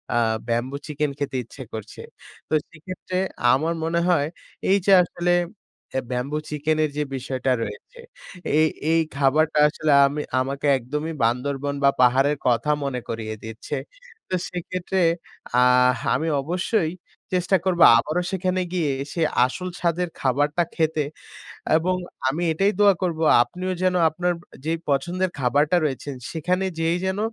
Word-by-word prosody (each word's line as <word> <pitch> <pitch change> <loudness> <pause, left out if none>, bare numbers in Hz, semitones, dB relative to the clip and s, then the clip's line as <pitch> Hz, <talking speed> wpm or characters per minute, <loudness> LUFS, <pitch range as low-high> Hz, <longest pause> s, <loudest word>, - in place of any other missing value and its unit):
আ - - +3 0.3
bamboo 120 +4 -1
chicken 150 -1 -1
খেতে 140 -2 -2
ইচ্ছে 130 +3 -11
করছে। 110 -1 -7 0.5
তো - - -4 0.2
সেক্ষেত্রে 185 +2 -6 0.4
আমার 160 +5 +1
মনে 165 +1 0
হয়, 150 -5 +3 0.4
এই 195 - +5
যে 200 - +4
আসলে 175 +1 -1 0.6
এ - - +3
ব্যাম্বু 125 +4 -2
চিকেনের 155 +1 0
যে 150 - +1
বিষয়টা 130 0 -2
রয়েছে। - - -9 0.6
এই 155 - +5 0.2
এই 165 - +4 0.2
খাবারটা 150 +3 +2
আসলে 155 0 -1 0.2
আমি 145 +2 -3 0.2
আমাকে 140 +2 -2
একদমই 150 +6 -4
বান্দরবন 135 +4 -1
বা 140 - +7
পাহাড়ের 135 +4 +4
কথা 120 +5 +2
মনে 125 -3 -2
করিয়ে 110 -1 -4
দিচ্ছে। 110 +1 -6 0.5
তো 185 - 0
সেক্ষেত্রে 185 +1 -3 0.6
আহ 125 0 +5 0.2
আমি 160 - -1
অবশ্যই 175 +2 0 0.4
চেষ্টা 180 +1 +2
করব 180 -2 +1 0.2
আবারও 155 +8 0
সেখানে 185 0 0
গিয়ে 160 -6 +1 0.2
সে 170 - -2 0.2
আসল 180 +8 -4
স্বাদের 175 +1 0
খাবারটা 145 +5 +1
খেতে। 160 -2 +1 0.7
এবং 180 +3 +1 0.3
আমি 150 +6 -1
এটাই 195 +6 +2
দোয়া 200 -2 +6
করব 170 -3 -1 0.2
আপনিও 180 +9 -4
যেন 185 0 +2 0.2
আপনার 175 +3 -1 0.3
যেই 165 +1 -1
পছন্দের 175 +7 0
খাবারটা 145 +6 +2
রয়েছেন 140 -1 -3 0.2
সেখানে 180 +4 -1
যেয়েই 165 +2 +1
যেন 190 +1 -1
155 Hz, 140 wpm, -23 LUFS, 135-175 Hz, 0.7 s, বা